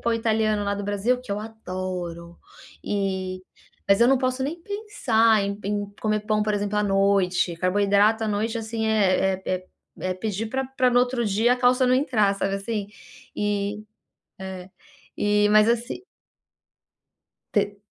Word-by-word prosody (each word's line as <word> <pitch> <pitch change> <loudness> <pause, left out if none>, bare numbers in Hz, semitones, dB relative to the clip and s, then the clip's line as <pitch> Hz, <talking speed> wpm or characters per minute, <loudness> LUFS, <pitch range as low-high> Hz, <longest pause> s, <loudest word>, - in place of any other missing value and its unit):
pão 235 - 0
italiano 220 -2 +1
lá 200 0 -1
do 205 0 -5
Brasil, 205 +5 0
que 225 -5 -6
eu 205 - -3
adoro, 185 -5 -6 0.5
e 190 -2 -2 0.5
mas 195 +1 +4
eu - - +6
não 270 -1 +4
posso 255 0 -1
nem 325 +5 -3
pensar 240 - +1
em 200 +1 -3
em 205 0 -1 0.2
comer 215 -1 +1
pão, 215 0 0
por 210 0 0
exemplo, 205 0 -2
à - - +2
noite, 195 -3 +2
carboidrato 205 +4 +2
à - - -1
noite, 220 +3 -1
assim, 220 0 -3
é 190 -3 +2
é 185 0 -2 0.3
é 185 0 -2
pedir 215 +2 -3
pra 265 +3 -2
pra 255 -1 +1
no 245 - +4
outro 245 -1 0
dia 220 +4 +3
a - - -7
calça 250 +1 +3
não 250 - +4
entrar, 225 -7 +2
sabe, 195 0 -1
assim. 205 0 -4 0.5
E 205 0 -2 0.6
é. 190 -1 -7 0.5
E 210 0 +2
mas, 215 +1 +5
assi 240 +10 -2 1.5
Te 205 -1 0
210 Hz, 160 wpm, -24 LUFS, 195-230 Hz, 1.5 s, eu